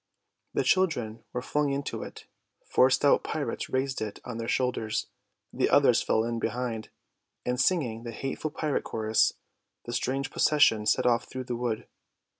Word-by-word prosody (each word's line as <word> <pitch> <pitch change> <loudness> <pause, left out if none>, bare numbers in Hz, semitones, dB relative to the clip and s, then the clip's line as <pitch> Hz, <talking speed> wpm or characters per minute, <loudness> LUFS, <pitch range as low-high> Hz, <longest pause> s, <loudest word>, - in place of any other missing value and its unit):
The - - +2
children 125 -13 +1
were 125 - -3
flung 145 0 0
into 140 0 -3
it, - - -9 0.4
four 130 - +4
stout 135 +2 +4
pirates 155 - -3
raised 130 0 -1
it 105 -2 -4
on 120 -2 -5
their 115 - -4
shoulders, 125 -4 0 0.5
the - - +1
others - - +5
fell 110 - +1
in 115 0 -2
behind, 115 -1 -3 0.6
and 125 +1 +1
singing 130 -8 +1
the 120 - -7
hateful 135 +6 -4
pirate 150 -1 -1
chorus 110 0 +2 0.5
the 120 - -5
strange 135 +2 -1
procession 115 -8 +4
set 105 - +3
off 120 -1 +3
through 130 - -5
the 125 -1 -4
wood. 120 -2 -2
125 Hz, 160 wpm, -28 LUFS, 115-135 Hz, 0.6 s, others